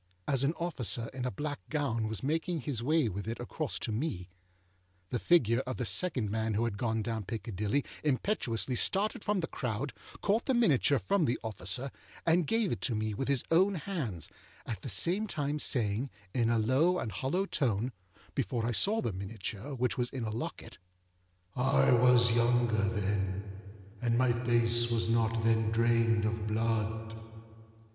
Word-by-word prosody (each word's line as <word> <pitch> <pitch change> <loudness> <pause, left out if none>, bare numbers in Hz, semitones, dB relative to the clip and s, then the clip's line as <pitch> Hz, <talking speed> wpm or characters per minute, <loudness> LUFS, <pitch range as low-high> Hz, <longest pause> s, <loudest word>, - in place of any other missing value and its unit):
As 135 -1 +2
an 145 +4 +2
officer 130 -9 -1
in 130 -1 -4
a 125 - -1
black 145 0 -4
gown 135 -8 0
was 110 -3 -4
making 160 +3 -1
his 125 -2 -3
way 155 +1 +2
with 100 0 -4
it 115 - -4
across 135 +4 -3
to 115 - -4
me, 105 - -3 0.8
the 120 - 0
figure 120 -9 +4
of 130 - -3
the 125 - -2
second 125 - +1
man 110 0 -1
who 110 - +1
had 115 -4 -1
gone 110 -3 0
down 115 -2 -3
Piccadilly 110 +4 -2 0.2
impetuously 130 - 0
started 200 - +2
from 205 -2 0
the 160 - -2
crowd, 125 +2 -3 0.3
caught 210 +3 +1
the 265 - +3
miniature 145 - +4
from 195 +3 +1
the 120 - +1
officer, 110 +5 -1 0.3
and 165 -1 +3
gave 225 -4 +1
it 110 - -3
to 115 - 0
me 110 0 -1
with 135 +6 -3
his 135 -3 +2
own 190 +4 +4
hands, 140 - -4 0.4
at 110 -5 -5
the - - -6
same 175 - +1
time 150 -4 -2
saying, 120 -1 0 0.2
in 115 -2 +2
a 115 - +3
low 135 +11 +3
and 110 - -3
hollow 135 - -1
tone, 125 - 0 0.4
âbefore 115 -2 -1
I 120 - 0
saw 210 - +3
the 110 - -1
miniature, 100 +6 -6
which 125 +1 -1
was 125 0 0
in 130 -3 -5
a 110 - -2
locket, 115 +3 -6 0.8
ââ_I 125 -2 +4
was 120 -2 +5
younger 120 -1 +3
then_, 100 -2 -1 0.6
and 120 -1 +1
my 130 0 +4
face 120 0 +2
was 115 -1 0
not 115 -1 +1
then 110 -1 +3
drained 115 -1 +3
of 110 -1 -2
blood. 110 0 -1
120 Hz, 175 wpm, -31 LUFS, 110-145 Hz, 0.8 s, was